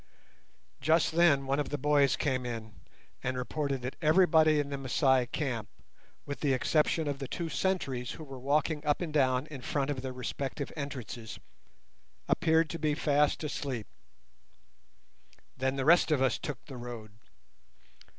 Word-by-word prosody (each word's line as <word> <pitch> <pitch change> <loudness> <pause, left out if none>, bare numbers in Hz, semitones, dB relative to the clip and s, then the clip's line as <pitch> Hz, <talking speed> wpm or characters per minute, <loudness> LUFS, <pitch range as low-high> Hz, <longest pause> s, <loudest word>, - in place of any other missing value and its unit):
Just 160 +1 +3
then 160 -5 +4
one 135 +2 0
of 145 - -1
the 145 - -2
boys 145 0 +3
came 130 -3 -1
in 115 -3 -5 0.5
and 130 0 -2
reported 135 0 -2
that 130 - -5
everybody 155 -2 +5
in 145 -1 -1
the 140 - -3
Masai 130 -1 +2
camp, 120 -6 -3 0.6
with 140 -3 -5
the 140 -3 +2
exception 155 +4 +1
of 140 -1 -2
the 135 - -4
two 165 +4 -4
sentries 140 -11 -1
who 160 - -9
were 135 -3 -9
walking 150 +3 0
up 145 +2 +1
and 165 -4 -3
down 130 -2 +2
in 140 -4 -7
front 140 +2 -1
of 135 -3 -3
the 130 0 -4
respective 135 +3 -4
entrances, 125 -6 -6 0.9
appeared 160 -1 +3
to 165 - -5
be 150 -2 +1
fast 150 0 +2
asleep. 135 -6 -3 1.7
Then 130 +1 -1
the 135 -1 -2
rest 170 +2 +6
of 150 -3 +2
us 130 -1 +2
took 150 - -6
the 135 -4 -9
road. 120 -3 -8
140 Hz, 160 wpm, -30 LUFS, 130-150 Hz, 1.7 s, rest